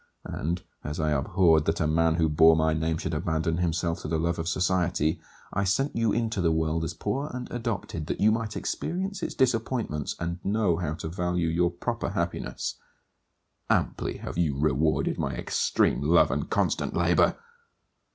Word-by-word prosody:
And, 85 +4 -3 0.2
as 75 +2 -4
I 75 -1 +1
abhorred 80 +2 +3
that 80 +1 0
a 80 - +1
man 80 +1 +2
who 80 -1 +2
bore 80 +2 +6
my 80 0 +2
name 80 +1 0
should 80 - -3
abandon 80 +1 0
himself 85 -1 -1
to - - -5
the 80 +1 0
love 85 +1 -1
of 80 - -3
society, 85 -3 +1 0.3
I 100 - +1
sent 135 +9 0
you 115 -2 +2
into 115 -3 0
the 85 -2 +3
world 80 0 0
as 80 0 -4
poor 140 - -2
and 125 -1 -5
adopted, 115 -9 -3
that - - -3
you 105 +2 +5
might 110 -1 -2
experience 190 +3 -3
its - - -3
disappointments 115 - 0
and 85 +1 -4
know 100 -4 +1
how 80 -3 -2
to 80 - -6
value 90 0 -1
your 85 +2 +2
proper 85 - -3
happiness. - - -3 0.9
Amply - - 0
have - - -5
you 75 -6 +1
rewarded 75 +1 +1
my 70 - -1
extreme - - +1
love 80 +4 +4
and - - -2
constant - - 0
labour! - - +3
85 Hz, 175 wpm, -27 LUFS, 80-100 Hz, 0.9 s, bore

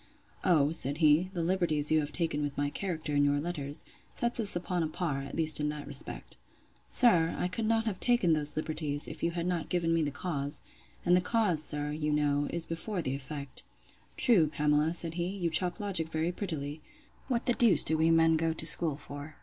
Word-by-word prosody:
O, 155 -6 +3
said 145 -3 +4
he, 160 +3 +4
the 170 -3 -2
liberties 165 -5 +2
you 155 - +4
have 150 -1 -3
taken 160 -3 -2
with 145 -1 -4
my 145 0 -1
character 160 -6 -3
in 145 - +3
your 145 0 +2
letters, 145 -3 -4 0.3
sets 235 0 0
us 210 -4 +2
upon 175 0 -2
a 160 - 0
par, 155 -4 -3
at 140 - -8
least 155 -2 +2
in 150 0 0
that 150 -1 -6
respect. 145 -2 -3 0.5
Sir, 170 -10 +3
I - - 0
could 215 +4 -3
not 225 0 +1
have 205 -5 -3
taken 240 -9 +3
those 150 -1 0
liberties, 155 -2 -1
if - - -8
you 170 - +1
had 170 0 -4
not 175 -3 -2
given 170 -2 0
me 165 - +2
the 150 - 0
cause: 145 -2 -4 0.4
and 175 - +5
the 180 - +3
cause, 190 -6 +1
sir, 150 -1 -2
you 150 0 -2
know, 145 -1 +1
is 170 -1 -1
before 175 +3 -4
the 130 - -2
effect. 140 0 -7 0.6
True, 195 -11 +4
Pamela, 150 +2 +1
said 165 -1 0
he; 170 +1 -2
you 180 -3 -3
chop 175 +2 +1
logic 190 -6 0
very 160 +2 -1
prettily. 155 -6 -5 0.5
What 245 -3 -1
the 245 - +3
deuse 235 -4 +4
do 160 - +2
we 160 +1 +2
men 165 0 +4
go 165 0 0
to 160 - -5
school 160 -2 +2
for? 145 +1 -9
160 Hz, 215 wpm, -30 LUFS, 150-180 Hz, 0.6 s, and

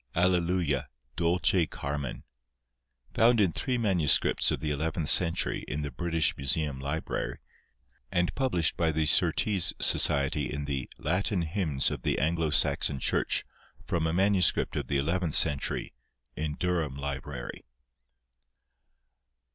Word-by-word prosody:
ALLELUIA, 85 -5 0 0.3
DULCE 85 0 +1
CARMEN 70 -2 -5 0.9
Found 115 +1 +3
in 95 -5 +3
three 125 - -2
MSS. 95 - +2
of - - -2
the 75 - -3
eleventh 80 +2 -2
century 85 -2 +3
in 75 +3 -4
the 70 - -5
British 80 +4 -1
Museum 70 0 -1
Library, 70 +4 -4 0.7
and 90 0 0
published 120 - 0
by 85 -1 0
the 80 0 -1
Surtees 95 +4 +4
Society 70 -2 +3
in 75 0 -4
the 70 -2 -4
"Latin 90 +3 -1
Hymns 80 -5 -1
of - - -5
the - - -1
Anglo 80 +2 0
Saxon 70 -1 +1
Church," - - 0 0.4
from 80 -2 -1
a - - -1
MS. 95 +1 +4 0.2
of - - -4
the 70 - -1
eleventh 85 +3 -1
century, 70 -1 0 0.4
in 75 -1 -4
Durham 85 -6 -2
Library. 70 -2 -6
80 Hz, 125 wpm, -28 LUFS, 70-90 Hz, 0.9 s, Surtees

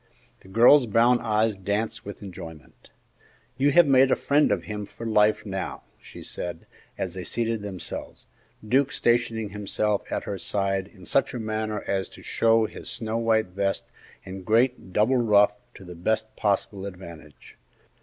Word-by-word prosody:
The - - -19
girl's 120 +6 +6
brown 120 +3 +4
eyes 110 0 +1
danced 105 +4 -3
with 100 +1 -8
enjoyment. 80 -5 -11 0.7
"You 140 +2 +3
have 175 -1 +7
made 135 -1 +5
a - - +4
friend 145 +1 +2
of - - 0
him 105 -1 -6
for 115 - -9
life, 105 -1 +3
now," 95 -2 -5 0.2
she - - -12
said 85 -2 -6 0.3
as 95 -3 -3
they 95 -1 -6
seated 115 +4 -2
themselves, 95 -4 -6 0.4
Duke 135 +4 +2
stationing 115 -2 0
himself 105 0 -1
at - - -2
her 100 - -5
side 95 -1 -1
in 95 -4 -16
such 135 - +1
a - - -3
manner 110 -1 -3
as 95 -1 -1
to - - -14
show 115 -1 +3
his - - -8
snow 110 0 -2
white 110 -3 +1
vest 100 +1 -2 0.3
and 95 0 -8
great 115 0 +1
double 110 +7 +3
ruff 105 -3 +4 0.2
to - - -12
the 90 - -9
best 110 +6 -2
possible 100 -1 -1
advantage. 85 -5 -12
105 Hz, 165 wpm, -25 LUFS, 95-115 Hz, 0.7 s, have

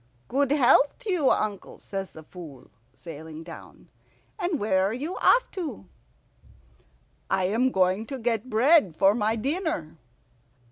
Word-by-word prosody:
"Good 275 +1 +1
health 285 0 +4
to 445 -5 -3
you, 315 -7 +2
uncle," 205 -2 -2
says 195 -1 -6
the 160 - -13
Fool, 155 - -12 0.2
sailing 160 -1 -9
down. 165 0 -12 0.5
"And 350 -3 -1
where 190 -2 +2
are 210 - -2
you 295 +9 -4
off - - +4
to?" 330 - -6 1.4
"I 190 -1 +1
am 230 +8 +1
going 190 +3 +1
to 270 - -5
get 235 0 -2
bread 240 - +4
for 195 0 +5
my 215 0 0
dinner." 270 - -3
220 Hz, 140 wpm, -26 LUFS, 185-280 Hz, 1.4 s, for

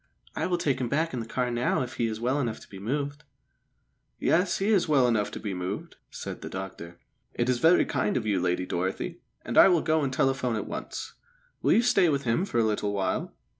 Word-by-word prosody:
I - - -1
will 180 -1 +1
take 140 -6 0
him 120 - -1
back 160 +4 0
in 125 - -2
the 115 - -5
car 125 +1 -1
now 120 +2 +1
if 125 - -8
he 115 - +1
is 110 -1 -4
well 130 +5 0
enough 120 -5 -2
to - - -14
be 95 - -10
moved." 145 +6 -3 0.9
"Yes, 180 +2 +2
he 195 +2 0
is 200 -6 +3
well 140 -5 +4
enough 110 -4 +1
to - - -7
be 105 -3 -4
moved," 90 +2 -5
said - - -7
the - - -6
doctor. 95 -3 -7 0.4
"It 120 +1 0
is 125 -1 +1
very 165 +6 +5
kind 130 -7 0
of 115 - -2
you, 100 -4 +1
Lady 90 0 0
Dorothy, 95 +2 -3 0.3
and - - +3
I - - +10
will 175 -4 +3
go 160 0 +2
and 135 -2 -1
telephone 130 -3 +1
at 105 - -3
once. - - -6 0.5
Will - - +4
you 235 - +4
stay 195 -8 +4
with 140 -2 0
him 120 +10 +1
for 190 - -3
a 115 - +4
little 105 -1 0
while?" 95 -2 -2
125 Hz, 235 wpm, -27 LUFS, 105-145 Hz, 0.9 s, I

